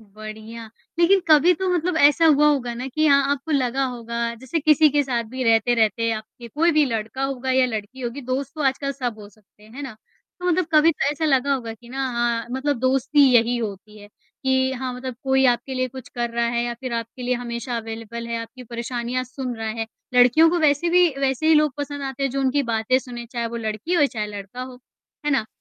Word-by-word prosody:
बढ़िया, 215 +2 -10 0.3
लेकिन 375 +3 +5
कभी 310 +3 +6
तो 375 +3 -2
मतलब 345 0 0
ऐसा 295 +2 +5
हुआ 300 -1 +5
होगा 260 -5 0
ना 250 +2 -5
कि 310 +4 +1
हाँ 280 -1 +5
अ - - 0
आपको 285 +3 -4
लगा 265 -1 +1
होगा 235 -1 -3
जैसे 260 +7 -3
किसी 305 +1 +5
के 290 0 +2
साथ 245 -3 -1
भी 260 0 -3
रहते-रहते 230 0 +2
आपके 220 +2 -8
कोई 330 +7 +2
भी 305 -1 +4
लड़का 225 +1 -3
होगा 265 -1 -3
या 260 0 +4
लड़की 220 +2 -6
होगी 245 +3 -4
दोस्त 260 +2 -3
तो 305 - -4
आजकल 275 +1 0
सब 245 -5 -4
हो 205 -1 -11
सकते 210 0 -26
हैं। 215 - -17
है 285 - -7
ना? 250 -6 -7 0.4
तो 360 - -3
मतलब 350 0 +1
कभी 310 +2 +6
तो 285 - 0
ऐसा 300 +2 -3
लगा 275 -1 +2
होगा 230 -4 -5
कि 235 +2 -18
ना 265 +1 -2
हाँ 235 0 0
मतलब 265 +1 -1
दोस्ती 270 +3 +2
यही 240 +1 +4
होती 210 -1 -6
है 205 - -13
कि, 260 +4 -2
हाँ 260 -1 -4
मतलब 255 0 -6
कोई 265 0 +3
आपके 245 +2 0
लिए 255 0 -1
कुछ 260 0 -10
कर 240 -1 -2
रहा 235 0 0
है 235 0 0
या 240 0 -3
फिर 255 -2 -5
आपके 230 +2 -5
लिए 250 +1 0
हमेशा 240 0 -4
अवेलेबल 230 +1 -6
है 235 - -3
आपकी 240 +3 -11
परेशानियाँ 240 +1 -3
सुन 255 -1 -5
रहा 220 0 -4
है। 225 0 -3 0.3
लड़कियों 250 +7 +6
को 350 - +1
वैसे 305 +1 +2
भी 360 0 +5
वैसे 270 +3 0
ही 320 - +6
लोग 300 -2 +3
पसंद 285 0 -5
आते 270 0 -5
हैं 275 - +1
जो 275 +2 -2
उनकी 270 +2 +1
बातें 230 +1 +1
सुनें 245 -2 -8
चाहे 235 -1 -3
वो 235 +1 -5
लड़की 220 +7 -4
हो 290 -5 +4
चाहे 215 -5 -4
लड़का 205 +4 -7
हो। 255 -1 -9 0.5
है - - +2
ना? 265 -6 +1
255 Hz, 230 wpm, -22 LUFS, 235-280 Hz, 0.5 s, कभी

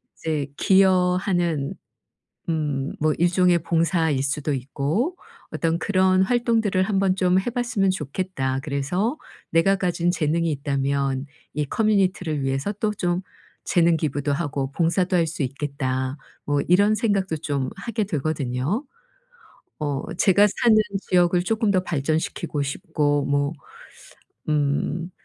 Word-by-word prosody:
이제 155 -4 -2
'기여하는 180 -5 +2 0.8
음 145 -4 -1
뭐 155 0 +2
일종의 175 0 +3
봉사일 165 -4 +1
수도 145 +2 -1
있고 145 - -2 0.4
어떤 165 0 0
그런 185 +1 +3
활동들을 225 -4 +1
한번 195 -1 +1
좀 185 -1 +3
해 190 - -1
봤으면 240 -5 0
좋겠다. 150 -5 -2
그래서 170 - -1 0.3
내가 165 +4 +3
가진 175 -2 0
재능이 165 0 0
있다면 140 -1 -1 0.3
이 150 - 0
커뮤니티를 185 -6 +1
위해서 135 +9 -1
또 210 +1 -1
좀 180 -2 -1 0.4
재능 170 -1 +3
기부도 145 -2 -1
하고 140 -3 -2
봉사도 175 +3 +1
할 170 -2 +3
수 155 -1 -4
있겠다.' 130 -1 -3 0.3
뭐 145 -1 +1
이런 200 +4 +4
생각도 195 -7 0
좀 145 -4 -2
하게 215 +2 -2
되거든요. 150 - -2 0.9
어 145 -3 -3
제가 195 +3 +5 0.2
사는 230 -2 +6 0.3
지역을 175 -1 +3
쪼끔 220 +1 +1
더 185 -2 +2
발전시키고 155 -1 -2
싶고 145 0 0
뭐 145 +1 +1 1.0
음 150 +3 0
170 Hz, 255 characters per minute, -23 LUFS, 145-190 Hz, 1.0 s, 사는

